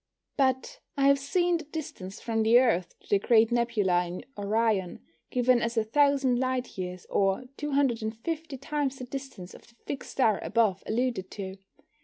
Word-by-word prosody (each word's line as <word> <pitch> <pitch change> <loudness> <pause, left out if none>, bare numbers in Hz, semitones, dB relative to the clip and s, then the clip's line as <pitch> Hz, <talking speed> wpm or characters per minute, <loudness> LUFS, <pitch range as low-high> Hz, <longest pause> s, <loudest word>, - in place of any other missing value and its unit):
But 265 - 0 0.2
I 275 - +3
have 280 0 +5
seen 345 +5 +1
the 325 - -8
distance 255 - -7
from 225 -1 -1
the 225 +2 +6
Earth 225 -9 +2
to - - -23
the 200 - +3
Great 225 +2 +4
Nebula 210 -7 +1
in 175 +1 -7
Orion 205 -2 0 0.3
given 250 -1 +3
as 235 0 -2
a 225 - +4
thousand 270 +1 +3
light 255 -1 -2
years, 180 -1 -5
or 195 +4 +1
250 275 +2 -1
times 280 0 -2
the 255 - -7
distance 255 -8 -8
of - - -15
the 235 - -23
fixed 275 - -5
star 220 -6 +3
above 215 -5 +1
alluded 235 -4 -1
to. 190 -1 -7
235 Hz, 165 wpm, -28 LUFS, 205-275 Hz, 0.3 s, the